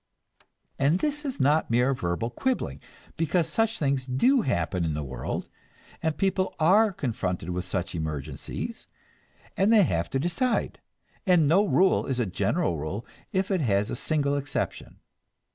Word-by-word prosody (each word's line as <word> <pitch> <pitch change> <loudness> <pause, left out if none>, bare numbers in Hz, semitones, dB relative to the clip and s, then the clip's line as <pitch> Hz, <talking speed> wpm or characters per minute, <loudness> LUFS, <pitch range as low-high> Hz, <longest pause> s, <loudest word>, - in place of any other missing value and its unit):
And 140 +5 +3
this 295 +7 0
is 275 -3 -3
not 145 +4 +3
mere 125 +3 +3
verbal 100 +1 -2
quibbling, 260 - -2 0.4
because 165 +1 +1
such 225 +7 0
things 135 -3 0
do 245 - +3
happen 90 - -1
in 80 -2 -1
the 75 - -3
world, 65 -2 -4 0.5
and 160 -1 -1
people 190 -1 0
are 200 +7 +5
confronted 95 - -3
with 90 +1 -3
such 90 -1 -3
emergencies, 75 -4 -5 0.7
and 195 +3 +3
they 220 -3 +7
have 85 - 0
to - - -1
decide, 175 - -1 0.5
and 175 -5 +5
no 180 +7 +5
rule 190 0 +3
is 130 -2 -1
a 120 - +2
general 100 - 0
rule 90 +9 -4 0.3
if 190 +1 0
it 185 -3 +1
has 105 -5 +1
a - - -2
single 145 +1 0
exception. 140 +1 -4
140 Hz, 155 wpm, -27 LUFS, -, 0.7 s, they